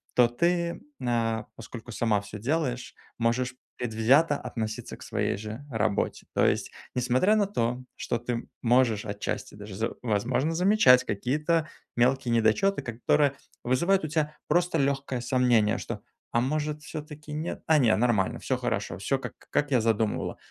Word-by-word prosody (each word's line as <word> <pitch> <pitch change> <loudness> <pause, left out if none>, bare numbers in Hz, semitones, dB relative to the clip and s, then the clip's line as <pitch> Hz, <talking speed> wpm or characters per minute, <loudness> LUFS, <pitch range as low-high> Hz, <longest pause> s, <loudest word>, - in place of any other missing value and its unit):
то 125 -1 +6
ты, 170 +7 0 0.2
на, 115 -3 0
поскольку 115 +1 -9
сама 110 -2 +1
всё 105 +1 -9
делаешь, 125 0 -1 0.2
можешь 120 +2 0 0.2
предвзято 125 +7 +3
относиться 110 -4 -5
к - - -19
своей - - -1
же 110 +7 -7
работе. 105 -3 -1
То - - +4
есть, - - +1 0.2
несмотря 125 - +3
на 205 -2 +2
то, 125 - -1
что 120 - -2
ты 120 0 -3
можешь 120 -3 +3
отчасти 100 0 -4
даже, 105 -1 -9
з 110 +4 -1
возможно, 125 +7 +1
замечать 180 -8 +6
какие-то 150 - 0 0.3
мелкие 125 0 +2
недочёты, 115 - +3
которые 130 +5 +2 0.3
вызывают 170 +9 +2
у - - -2
тя 150 0 -1
просто 175 +2 +2
лёгкое 135 -3 0
сомнение, 120 -3 +3
что: - - -5 0.3
"А 120 - +2
может, 150 +3 -1
всё-таки 150 -1 -8
нет? 155 +3 -4
А, 160 -1 +5
не, 115 -5 +4
нормально, 110 -5 +1
всё - - -1
хорошо, - - -2
всё - - 0
как - - -7 0.2
как 145 0 0
я 125 -3 +4
задумывала". 110 -1 0
125 Hz, 150 wpm, -27 LUFS, 115-150 Hz, 0.3 s, то